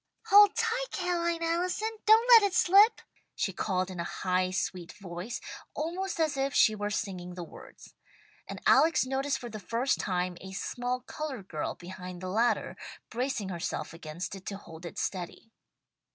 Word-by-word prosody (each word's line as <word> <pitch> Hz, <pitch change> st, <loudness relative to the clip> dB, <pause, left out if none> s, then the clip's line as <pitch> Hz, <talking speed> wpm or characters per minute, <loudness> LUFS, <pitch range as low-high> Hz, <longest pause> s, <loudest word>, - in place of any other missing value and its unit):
"Hold 410 Hz, 0 st, +8 dB
tight, 465 Hz, +2 st, 0 dB
Ca'line 340 Hz, -2 st, -1 dB
Allison! 360 Hz, +6 st, 0 dB, 0.2 s
Don't 445 Hz, +3 st, +7 dB
let 470 Hz, -2 st, +10 dB
it 400 Hz, -3 st, +1 dB
slip!" 400 Hz, +5 st, +6 dB, 0.3 s
she 195 Hz, -, -1 dB
called 185 Hz, 0 st, -1 dB
in 180 Hz, -, -7 dB
a -, -, 0 dB
high 185 Hz, +1 st, 0 dB
sweet 185 Hz, -1 st, -3 dB
voice, 190 Hz, +4 st, -6 dB, 0.4 s
almost 350 Hz, +4 st, -3 dB
as 310 Hz, -3 st, +1 dB
if 275 Hz, +1 st, -1 dB
she 220 Hz, -, +6 dB
were 205 Hz, -1 st, -3 dB
singing 185 Hz, -4 st, -4 dB
the 180 Hz, -, -5 dB
words, -, -, -13 dB, 0.5 s
and -, -, -6 dB
Alex 305 Hz, +1 st, +5 dB
noticed 270 Hz, +2 st, -1 dB
for 240 Hz, -2 st, -8 dB
the 215 Hz, -, -6 dB
first 230 Hz, +7 st, 0 dB
time, 180 Hz, -2 st, -1 dB
a 190 Hz, 0 st, -9 dB
small 245 Hz, +5 st, -3 dB
coloured 260 Hz, -6 st, -6 dB
girl 155 Hz, -5 st, -3 dB
behind 180 Hz, 0 st, -9 dB
the 185 Hz, +1 st, -5 dB
ladder, 230 Hz, +5 st, +1 dB, 0.4 s
bracing 240 Hz, -5 st, -2 dB
herself 170 Hz, -2 st, -4 dB
against 165 Hz, +2 st, -6 dB
it 195 Hz, -1 st, -10 dB
to 200 Hz, -, -4 dB
hold 165 Hz, -3 st, -10 dB
it -, -, -10 dB
steady. 185 Hz, +4 st, -4 dB
225 Hz, 165 wpm, -29 LUFS, -, 0.5 s, let